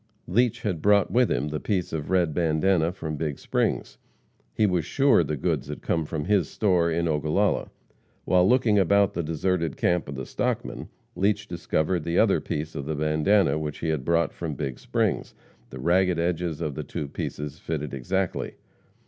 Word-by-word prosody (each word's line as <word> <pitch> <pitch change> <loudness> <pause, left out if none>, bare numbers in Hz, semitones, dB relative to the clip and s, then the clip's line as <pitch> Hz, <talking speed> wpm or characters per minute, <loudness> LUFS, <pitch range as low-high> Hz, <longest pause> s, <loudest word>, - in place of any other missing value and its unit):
Leach 120 +4 +1
had 90 -7 -2
brought 100 0 +4
with 125 0 +3
him 75 - 0
the 75 0 -3
piece 95 -6 -2
of 75 -1 -3
red 90 -4 +2
bandana 85 +1 +2
from 80 -4 -5
Big 75 -2 -2
Springs. - - -1 0.5
He 105 - +2
was 90 -4 +1
sure 135 - +3
the 75 0 -3
goods 70 - -1
had 75 - -7
come 80 -2 0
from 75 -1 -4
his 100 -5 +2
store 90 -5 +2
in 85 +1 0
Ogallala. 80 +6 +1 0.6
While 90 +1 +4
looking 120 -5 +4
about 100 +2 +3
the 85 - -1
deserted 80 0 -1
camp 85 -4 +1
of 70 - -5
the 65 - -5
"stockmen," - - -3 0.3
Leach 105 +2 +1
discovered 85 0 -1
the 85 +2 -1
other - - +4
piece 75 +2 -4
of 70 - -5
the 80 - -2
bandana 75 +4 +2
which 75 -1 -4
he 80 - -3
had 75 -4 -1
brought 85 +2 +1
from 80 -4 -4
Big 70 -4 -4
Springs. - - -1 0.3
The 65 - -9
ragged 90 +4 +2
edges 85 -1 -1
of 75 -3 -2
the - - -5
two 75 - -5
pieces 75 +1 -5
fitted 75 -3 -4
exactly. 90 +8 -2
85 Hz, 180 wpm, -26 LUFS, 75-95 Hz, 0.6 s, brought